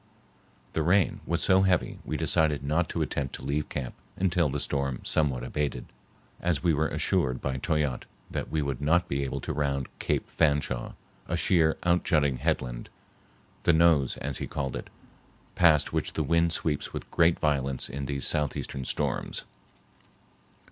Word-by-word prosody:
The 80 - 0
rain 90 +4 +3
was 85 +1 0
so 95 0 +5
heavy 95 -3 +1
we - - -3
decided 75 -3 +2
not 80 +5 +1
to - - -1
attempt 70 -2 -3
to - - -9
leave 75 +1 -1
camp 65 -4 -4 0.2
until 90 -4 +2
the 75 +2 -2
storm 70 -3 -2
somewhat 70 -6 +1
abated, 65 -2 -2 0.5
as 85 -5 0
we 85 - +4
were 80 +1 +1
assured 75 -3 0
by 65 -1 -2
Toyatte 75 -3 -1 0.2
that - - -3
we 80 -1 0
would 70 -2 -3
not 85 +5 +3
be 70 0 -1
able 65 - -3
to - - -3
round 70 -2 -1
Cape - - -1
Fanshawe, 75 -6 0 0.3
a - - -1
sheer, 80 -3 +3
outjutting 80 -6 +2
headland, - - -2 0.7
the 85 - +4
nose 80 -5 +4
as 70 -2 -4
he - - -3
called 70 -3 -3
it, - - -6 0.6
past 80 -4 +4
which - - -1
the - - 0
wind 85 0 +2
sweeps 75 -3 -1
with - - -6
great 85 0 +4
violence 70 -4 0
in 70 +1 -5
these 70 -2 -1
southeastern 70 -2 -1
storms. - - -2
75 Hz, 160 wpm, -28 LUFS, 70-85 Hz, 0.7 s, so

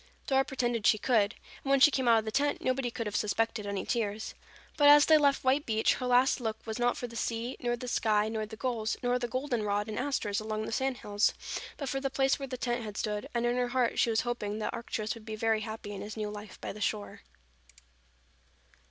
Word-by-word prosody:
Dora 270 -1 +3
pretended 240 -5 -1
she 215 - +5
could, 220 -2 +2 0.3
and 275 - -4
when 275 0 +5
she 295 +3 +7
came 260 -2 0
out 230 -1 +6
of 220 - 0
the 220 - -3
tent, 285 +4 +1
nobody 255 -1 0
could 230 -1 -4
have 210 - -4
suspected 220 0 0
any 200 -1 -3
tears. 220 -3 -2 0.4
But 290 -1 +6
as 290 0 +8
they 315 - +6
left 280 -2 +2
White 265 +3 +3
Beach, 220 -1 +3
her 255 - -3
last 250 +1 +4
look 220 -2 -2
was 220 +1 -4
not 245 0 +2
for - - -4
the 235 -1 -9
sea 230 +2 -2
nor 240 -1 0
the 250 - -7
sky 215 -3 +2
nor 220 -1 -3
the 220 - -9
gulls, 225 -2 -2
nor 245 0 +1
the 240 - -2
goldenrod 230 -5 -1
and 215 0 -4
asters 245 -7 -1
along 215 0 -3
the - - -5
sandhills, 225 -5 0 0.4
but 280 - -4
for 270 +1 -1
the 270 - -1
place 270 +1 +1
where 275 - -4
the 255 -1 -5
tent 240 -1 -2
had 210 -1 -7
stood, 210 -1 -2
and 235 0 +1
in 240 0 +1
her 250 0 +1
heart 245 -1 0
she - - +3
was 225 -1 +2
hoping 215 -4 -3
that 220 - -3
Arcturus 220 -2 -3
would 230 - -12
be 220 0 -5
very 220 0 +1
happy 215 -1 -6
in 200 - -6
his 210 +1 -7
new 210 -1 -3
life 210 -1 -9
by - - -5
the 210 - -10
shore. 210 0 -2
230 Hz, 240 wpm, -30 LUFS, 215-255 Hz, 0.4 s, as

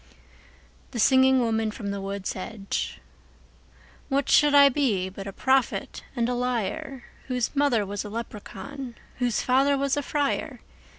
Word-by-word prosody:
The 240 - -5
Singing 260 +2 +5
Woman 225 -2 +1
from 210 -1 -5
the 200 0 -4
Wood's 195 -1 -4
Edge 195 +1 -4 1.1
WHAT 275 0 0
should 295 -1 +5
I 280 0 +9
be 245 -10 +1
but 195 +1 -8
a - - -4
prophet 265 +4 0
and 235 -2 +1
a 250 - 0
liar, 245 +1 -2 0.2
Whose 250 0 -1
mother 275 -7 +2
was 200 +1 -4
a 210 - -7
leprechaun, 235 +4 -7 0.2
whose 245 -3 0
father 270 +2 +3
was 275 0 +1
a 290 - 0
friar? 285 0 -2
245 Hz, 145 wpm, -26 LUFS, 210-275 Hz, 1.1 s, I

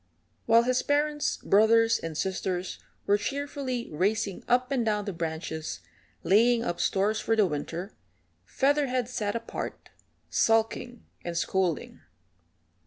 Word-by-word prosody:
While 230 +1 +6
his 255 +1 +1
parents, 295 +1 0
brothers, 225 +2 +4
and 165 -2 -5
sisters 185 0 -2 0.3
were 205 +1 +3
cheerfully 275 0 -3
racing 195 +4 -1
up 250 +2 +2
and 260 -3 +1
down 210 -2 0
the 200 - -3
branches 160 -1 -4 0.4
laying 230 +4 +4
up 175 -6 -3
stores 205 +3 +1
for 225 - +1
the 215 -2 +4
winter, 170 +4 -4 0.5
Featherhead 270 -3 +1
sat 215 -4 -2
apart, 230 0 -6 0.4
sulking 225 +2 +1 0.2
and 170 -1 -4
scolding. 180 -3 -1
220 Hz, 120 wpm, -28 LUFS, 185-245 Hz, 0.5 s, While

